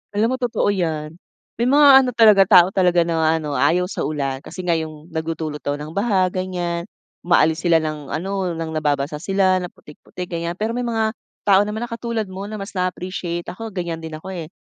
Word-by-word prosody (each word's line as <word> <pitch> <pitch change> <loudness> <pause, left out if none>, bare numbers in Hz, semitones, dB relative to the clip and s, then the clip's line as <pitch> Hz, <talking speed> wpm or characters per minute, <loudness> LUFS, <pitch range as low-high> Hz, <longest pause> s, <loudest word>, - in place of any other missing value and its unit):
Alam 225 +5 +2
mo - - -1
totoo 230 -4 +1
'yan. 155 -4 -2 0.5
May 240 - +2
mga 290 +1 +6
ano 255 - -1
talaga, 215 -4 +7
tao 175 -1 +8
talaga 180 -2 +3
na 160 -1 +1
ano 150 -2 -4
ayaw 180 +5 +2
sa 185 - -5
ulan 140 -3 -2
kasi 185 - -8
nga 170 - +2
yung 155 -1 -4
nagdudulot 160 -2 -3
daw 145 - -2
ng 150 +1 -7
baha 200 -2 +2
ganyan, 175 -2 -3 0.3
umaalis 160 -2 +3
sila 165 -1 +5
ng 150 -2 -4
ano 190 +2 -2
ng 165 -1 -4
nababasa 150 -1 -1
sila 190 -1 +2
ng 180 - -5
putik-putik, 175 +4 -10
ganyan. 170 +1 -3
Pero 220 +2 -1
may 245 - -2
mga 220 -1 0 0.3
tao 195 -1 +6
naman 215 +3 -3
na 240 - -14
katulad 230 -1 -3
mo 195 +1 -7
na 215 - -5
mas 195 +1 -7
naa-appreciate 180 -1 -3
ako 225 +4 -7
ganyan 175 -4 -4
din 160 -1 -7
ako 190 +4 -8
eh. 165 -3 -6
180 Hz, 200 wpm, -21 LUFS, 160-200 Hz, 0.5 s, tao